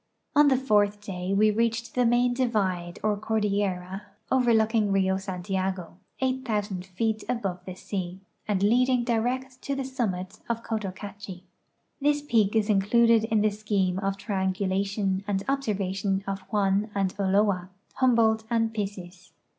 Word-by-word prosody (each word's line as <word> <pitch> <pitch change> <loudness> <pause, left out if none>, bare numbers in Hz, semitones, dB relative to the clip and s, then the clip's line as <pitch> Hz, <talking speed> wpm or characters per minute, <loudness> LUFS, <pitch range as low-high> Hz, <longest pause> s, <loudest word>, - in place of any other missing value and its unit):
On 295 0 +7
the 265 -2 +4
fourth 210 -5 +2
day 190 -2 -5
we 215 +2 +4
reached 230 +1 -1
the 250 -1 +3
main 245 +1 +3
divide 195 -9 -1
or 215 -1 +2
cordillera 200 -3 -1 0.3
overlooking 225 -4 +3
Rio 190 -1 +2
Santiago, 190 -2 -3 0.2
8,000 215 -8 -1
feet 215 +3 -1
above 195 -8 -2
the 185 - -7
sea, 185 -1 -5 0.3
and 200 -2 0
leading 250 +3 +3
direct 250 +2 -1
to 280 - -2
the 275 - -2
summit 215 -7 -3
of 230 0 -2
Cotocachi. 200 -3 -6 0.6
This 290 +1 +2
peak 225 -7 +2
is 215 -2 +2
included 225 +2 +4
in 220 -2 +1
the 215 0 +3
scheme 200 -3 0
of 195 0 -1
triangulation 195 0 -1
and 195 -1 -1
observation 195 -7 -1
of 195 0 -3
Juan 205 0 +1
and 195 -2 0
Ulloa, 195 -2 +2 0.3
Humboldt 230 -4 +3
and 225 -1 +1
Pissis. 195 -4 -6
205 Hz, 140 wpm, -27 LUFS, 190-230 Hz, 0.6 s, On